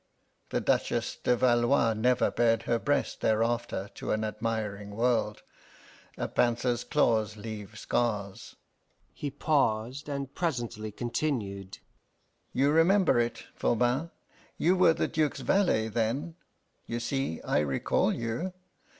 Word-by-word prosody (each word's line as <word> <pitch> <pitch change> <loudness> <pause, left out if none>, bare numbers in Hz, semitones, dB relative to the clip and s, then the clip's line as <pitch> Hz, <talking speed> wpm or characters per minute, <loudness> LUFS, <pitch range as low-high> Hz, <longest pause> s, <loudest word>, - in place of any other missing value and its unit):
The - - 0
Duchess - - 0
de 125 - +2
Valois 120 -1 +3
never 125 +3 +2
bared 115 -1 +2
her 115 -1 +1
breast 145 +3 -1
thereafter 115 -2 0
to - - -4
an 110 0 0
admiring 105 -2 -3
world 115 -2 0 0.7
a - - -2
panther's 120 0 +1
claws 110 -7 +1
leave 110 0 -7
scars." 105 -5 -2 0.6
He 145 - -4
paused, 135 -1 0
and 140 -1 -4
presently 120 -10 -3
continued: 105 -5 -3 0.7
"You 140 +3 +2
remember 170 -2 +4
it, 120 0 -1
Voban; 125 +7 +1 0.5
you 180 +3 +3
were 180 -3 +5
the - - 0
Duke's 155 -2 -1
valet 175 - +2
then 115 +8 -1 0.5
you 120 - -3
see 125 - -2
I - - +1
recall 70 -3 +1
you! 120 +11 -3
120 Hz, 120 wpm, -29 LUFS, 110-140 Hz, 0.7 s, were